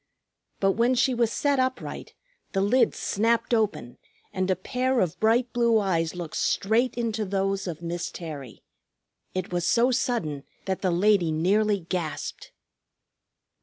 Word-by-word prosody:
But 195 0 +3
when 235 +5 +2
she 255 +1 +2
was 235 -2 +1
set 285 +1 +1
upright 260 0 -3 0.4
the 195 - +1
lids 235 +6 +3
snapped 230 +3 +1
open 210 - -1 0.3
and 185 0 -1
a 185 - +3
pair 250 +7 -1
of 175 -3 0
bright 235 +2 +2
blue 235 -2 +3
eyes 175 -5 0
looked 170 -3 -5
straight 230 +5 +1
into 225 -2 -1
those 195 0 -1
of 170 -1 -6
Miss 170 0 -3
Terry. 145 -8 -8 0.7
It 185 -1 -3
was 175 -1 0
so 245 +2 +3
sudden 200 - -1 0.2
that 190 -1 -2
the 185 - +1
lady 180 -1 +3
nearly 200 +5 +2
gasped. 165 -3 -4
200 Hz, 145 wpm, -26 LUFS, 175-235 Hz, 0.7 s, But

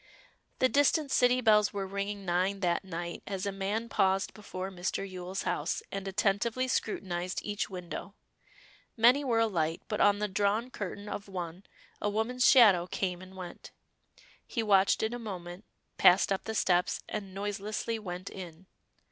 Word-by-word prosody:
The 255 - +4
distant 285 +1 +2
city 250 0 +4
bells 210 -3 +4
were 200 -1 -2
ringing 200 +1 -4
nine 185 +3 0
that 175 0 +1
night 170 -2 -5
as 195 -1 -3
a 200 - -1
man 200 +4 -2
paused 195 -3 +1
before 190 -2 -6
Mr. 190 +2 -3
Yule's 185 0 -5
house, 155 +3 -1
and 195 0 -4
attentively 210 +6 +1
scrutinized 180 -7 -2
each 205 -1 -2
window. 185 +2 -7 0.8
Many 245 +6 +5
were 240 -4 +1
alight, 170 -8 0
but 210 - -1
on 205 0 +5
the 210 0 -1
drawn 205 +5 0
curtain 205 -1 -6
of 205 0 -5
one 180 -1 -6 0.4
a 205 - +1
woman's 225 +4 +2
shadow 200 -9 +7
came 180 -1 -2
and 185 0 -12
went. 180 -2 -8 0.8
He 230 - -2
watched 195 -1 +4
it 220 +2 0
a 245 - -4
moment, 185 -3 -7 0.3
passed 185 +2 +6
up 195 - -1
the 220 - -3
steps, 180 -3 +2
and 195 -3 -5
noiselessly 205 +3 -3
went 185 -2 -6
in. 180 -1 -9
195 Hz, 160 wpm, -30 LUFS, 185-215 Hz, 0.8 s, shadow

